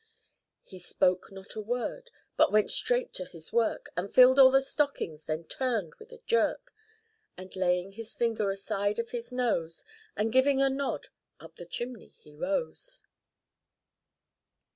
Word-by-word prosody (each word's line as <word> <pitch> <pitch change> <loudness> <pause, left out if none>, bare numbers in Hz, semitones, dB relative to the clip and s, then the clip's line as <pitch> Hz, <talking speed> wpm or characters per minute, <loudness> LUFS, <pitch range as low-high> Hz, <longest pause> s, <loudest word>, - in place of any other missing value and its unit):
He 185 - -12
spoke 180 +1 0
not 195 0 -10
a 215 - -5
word, 245 - -4 0.3
but - - +4
went 215 0 +3
straight - - 0
to 185 - -4
his 165 -3 -10
work, 235 -1 0
And 190 +3 -3
filled 255 +1 +7
all 265 -1 +10
the 270 +1 +4
stockings; 270 - -2
then 155 +1 -3
turned 225 -2 -2
with 445 +1 -14
a 485 - -11
jerk, 470 - 0 0.6
And 185 +1 -10
laying 180 0 0
his 225 +2 -8
finger 225 -4 0
aside 200 +1 -1
of 230 0 -3
his 240 0 -6
nose, 215 -10 -1 0.3
And 220 +2 -1
giving 265 +1 +4
a 270 0 +3
nod, 275 +1 -3 0.3
up - - -14
the - - -10
chimney 240 -2 -6
he 150 - -20
rose. 480 - -3
230 Hz, 155 wpm, -29 LUFS, 185-270 Hz, 0.6 s, all